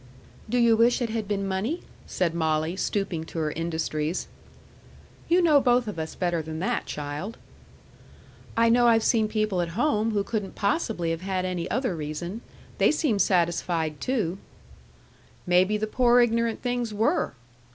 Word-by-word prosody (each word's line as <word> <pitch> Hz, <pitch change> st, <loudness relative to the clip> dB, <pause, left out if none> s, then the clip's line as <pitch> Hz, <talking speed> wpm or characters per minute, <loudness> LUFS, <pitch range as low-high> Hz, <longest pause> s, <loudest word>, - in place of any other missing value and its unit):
"Do 245 Hz, -, +1 dB
you 235 Hz, -2 st, +5 dB
wish 235 Hz, +3 st, +4 dB
it 235 Hz, -3 st, -2 dB
had 220 Hz, -2 st, -3 dB
been 200 Hz, -1 st, -1 dB
money?" 205 Hz, -, -2 dB, 0.2 s
said 175 Hz, -3 st, 0 dB
Molly, 160 Hz, 0 st, 0 dB
stooping 190 Hz, -4 st, -2 dB
to 165 Hz, -, -9 dB
her 155 Hz, -2 st, 0 dB
industries. 160 Hz, 0 st, -2 dB, 1.0 s
"You 350 Hz, +1 st, +4 dB
know 300 Hz, -4 st, +5 dB
both 245 Hz, -2 st, +3 dB
of 205 Hz, -6 st, -5 dB
us 160 Hz, 0 st, -5 dB
better 175 Hz, -2 st, 0 dB
than 155 Hz, 0 st, -6 dB
that, 180 Hz, -, -1 dB
child." 150 Hz, +9 st, -5 dB, 1.2 s
"I 230 Hz, 0 st, +5 dB
know 240 Hz, +1 st, +5 dB
I've 225 Hz, -1 st, +4 dB
seen 220 Hz, -3 st, +3 dB
people 215 Hz, -4 st, 0 dB
at 170 Hz, +2 st, -4 dB
home 225 Hz, -5 st, +2 dB
who 205 Hz, -2 st, 0 dB
couldn't 205 Hz, -2 st, -4 dB
possibly 200 Hz, -, 0 dB
have 165 Hz, +1 st, -3 dB
had 185 Hz, -1 st, -2 dB
any 180 Hz, -1 st, -3 dB
other 250 Hz, -6 st, -1 dB
reason. 160 Hz, +7 st, -5 dB, 0.4 s
They -, -, +5 dB
seemed 280 Hz, -10 st, +1 dB
satisfied, 170 Hz, -4 st, 0 dB
too." 200 Hz, -8 st, -1 dB, 1.1 s
"Maybe 185 Hz, +3 st, +3 dB
the 215 Hz, -, -1 dB
poor 245 Hz, +2 st, +3 dB
ignorant 230 Hz, -1 st, +1 dB
things 245 Hz, -2 st, -1 dB
were!" 220 Hz, -, 0 dB
200 Hz, 160 wpm, -26 LUFS, 170-230 Hz, 1.2 s, you